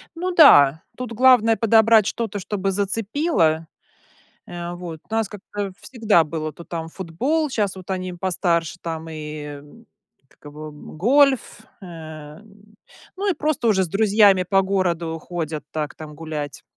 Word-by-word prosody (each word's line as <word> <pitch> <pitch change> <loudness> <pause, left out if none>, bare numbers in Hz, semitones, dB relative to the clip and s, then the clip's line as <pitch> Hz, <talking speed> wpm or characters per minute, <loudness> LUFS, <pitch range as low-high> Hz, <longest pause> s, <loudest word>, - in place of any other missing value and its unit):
Ну 365 +2 -2
да, 155 - +7
тут 250 -2 -5
главное 230 -2 +5
подобрать 225 -1 +4
что-то, 220 -3 -3
чтобы 195 0 -2
зацепило. 200 - 0 0.8
Э, 175 0 -6
вот, 175 -3 -8
у - - -13
нас 225 -2 0
как-то 205 -1 -6
всегда 220 -9 +2
было 155 0 -4
то 170 - -12
там 165 -1 -5
футбол, 250 - -2
щас 205 -6 -1
вот 185 +1 -10
они 185 -1 -3
постарше, 175 -2 -1
там 165 -1 -5
и, 155 -1 -7 0.2
м, 185 +11 -18 0.4
как - - -29
его, 150 +1 -9
м, 150 +1 -12
гольф. 265 - +3 0.2
Эм, 170 +5 -12 0.4
ну, 400 +1 0
и - - 0
просто 300 -6 -1
уже 190 -3 +3
с - - -7
друзьями 200 0 +4
по 195 +2 +2
городу 175 -4 -1
ходят 160 -3 -5
так, 150 -2 -4
там 155 -1 -10
гулять. 150 -3 -6
190 Hz, 150 wpm, -22 LUFS, 160-220 Hz, 0.8 s, да